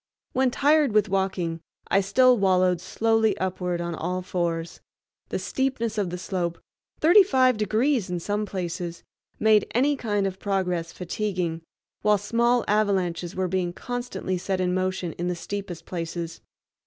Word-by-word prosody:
When 260 0 +3
tired 290 -1 +3
with 215 -1 +3
walking 185 -4 -1 0.3
I 195 - +3
still 250 +6 +5
wallowed 185 -4 +2
slowly 225 +3 +1
upward 180 -1 -2
on 170 0 -3
all 180 +3 -3
fours. 170 -2 -2 0.5
The - - -1
steepness 235 -5 -1
of 195 -3 0
the 180 - -4
slope—thirty 185 - +1
five 260 -9 +3
degrees 220 +2 +1
in 180 -1 -2
some 205 +4 -2
places—made 185 +4 -1
any 280 +4 +3
kind 205 -6 -1
of 190 -1 -3
progress 180 -4 -1
fatiguing, 180 -3 -3 0.4
while 210 0 +4
small 235 +4 +1
avalanches 190 -5 0
were 185 0 0
being 180 -1 -1
constantly 240 -6 -4
set 190 +1 -2
in 180 -1 +1
motion 185 -2 -1
in 175 - -1
the 180 - -1
steepest 180 -2 -6
places. 165 -1 -5
190 Hz, 140 wpm, -25 LUFS, 180-220 Hz, 0.5 s, still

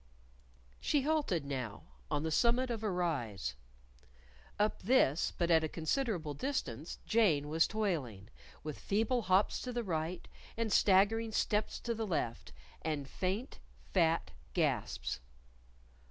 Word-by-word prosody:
She 285 -3 +1
halted 285 - +1
now 130 -7 -4 0.3
on 145 - 0
the 160 - -1
summit 240 +7 +3
of 225 -2 -3
a 215 - 0
rise. 140 - -1 1.0
Up 210 +1 +1
this, 185 - +3
but 170 -1 +1
at 160 -1 +5
a 155 - -1
considerable 170 - -1
distance, 150 - -3
Jane 165 -11 +3
was 160 +1 +3
toiling, 150 - -2 0.3
with 155 -1 -5
feeble 225 +5 +1
hops 190 0 +2
to 250 - -4
the 240 -1 -2
right, 165 -2 -2 0.3
and 225 -2 0
staggering 215 +4 +4
steps 210 0 0
to 235 - -1
the 225 -1 -3
left, 140 - -2 0.3
and 150 -3 -2
faint, 195 - -3 0.3
fat 165 - +2 0.2
gasps. - - 0
185 Hz, 130 wpm, -34 LUFS, 155-225 Hz, 1.0 s, at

